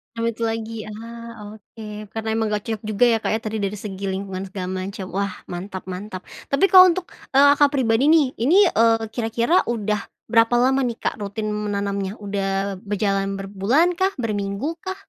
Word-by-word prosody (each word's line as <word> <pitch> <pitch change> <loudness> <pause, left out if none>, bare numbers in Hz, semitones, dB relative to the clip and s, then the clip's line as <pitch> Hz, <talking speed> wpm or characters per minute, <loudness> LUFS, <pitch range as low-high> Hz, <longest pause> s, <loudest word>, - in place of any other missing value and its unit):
Duit 230 0 -2
lagi, 225 -1 -3
ah, 230 0 -9
oke 210 0 -9
karena 225 0 -4
emang 220 0 0
gak 210 -1 -2
cocok 220 -2 -4
juga 215 +2 +1
ya 235 -2 +5
Kak - - -2
ya - - -1
tadi 220 0 -3
dari 200 0 -2
segi 200 -1 -6
lingkungan 190 0 -4
segala 185 -1 -5
macam 190 +2 -4
wah 200 +1 -1 0.2
mantap 185 +2 -6
mantap. 185 0 -7 0.2
Tapi 275 +7 +3
kalau 370 -1 +10
untuk, 360 0 -1 0.2
eee, 285 +1 +7
Kakak 290 0 +5
pribadi 250 0 +2
nih 305 -4 +5
ini, 330 - +5
eee, 225 -1 +2
kira-kira 235 +9 +1
udah 210 -3 -1 0.3
berapa 230 +1 +4
lama 260 +2 +3
nih 235 - -3
Kak - - -1
rutin 210 +1 -3
menanamnya? 200 -1 -2
Udah 195 -2 -2
berjalan 195 -1 -1
berbulan 200 - +1
kah? 385 +1 +1
Berminggu 215 +7 -3
kah? 375 +3 -5
215 Hz, 175 wpm, -22 LUFS, 200-235 Hz, 0.3 s, kalau